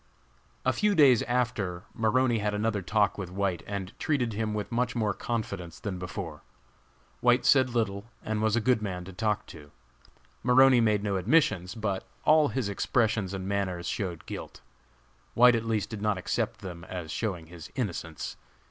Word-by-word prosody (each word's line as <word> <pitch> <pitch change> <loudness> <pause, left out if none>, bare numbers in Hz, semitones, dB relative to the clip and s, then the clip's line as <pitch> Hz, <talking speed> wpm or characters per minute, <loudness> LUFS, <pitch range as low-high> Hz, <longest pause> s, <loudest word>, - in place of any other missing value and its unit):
A - - +3
few 210 -1 +2
days 135 -7 +6
after, 115 -8 -1
Maroney 120 +1 +2
had 105 0 -1
another 105 -1 0
talk 105 +2 +1
with 95 -3 -4
White 95 -1 -1
and 100 -2 -4
treated 130 -7 0
him 105 0 -2
with 105 +1 -4
much 125 +1 0
more 110 -3 +1
confidence 100 -7 -4
than 100 -5 -4
before. 90 -4 -6 0.8
White 125 +1 +3
said 130 -2 +5
little, 100 -3 0 0.2
and 110 0 -2
was 110 0 +2
a 120 - +2
good 120 0 +2
man 90 -4 -4
to 95 - -9
talk 105 +2 -1
to. 75 -2 -12 0.7
Maroney 125 0 +6
made 105 -2 +2
no 100 -2 0
admissions, 105 - +2
but 100 -4 -2 0.2
all 155 -1 +6
his 130 -6 -2
expressions 105 -1 0
and 95 -1 -4
manners 95 -3 -2
showed 90 -5 -3
guilt. - - -8 0.7
White 125 +1 +7
at 115 -1 0
least 110 -1 -1
did 110 -2 -5
not 105 -2 +1
accept 110 +3 -2
them 90 -4 -7
as 85 -4 -6
showing 95 -8 -3
his 85 -1 -11
innocence. 85 - -4
105 Hz, 170 wpm, -28 LUFS, 95-120 Hz, 0.8 s, White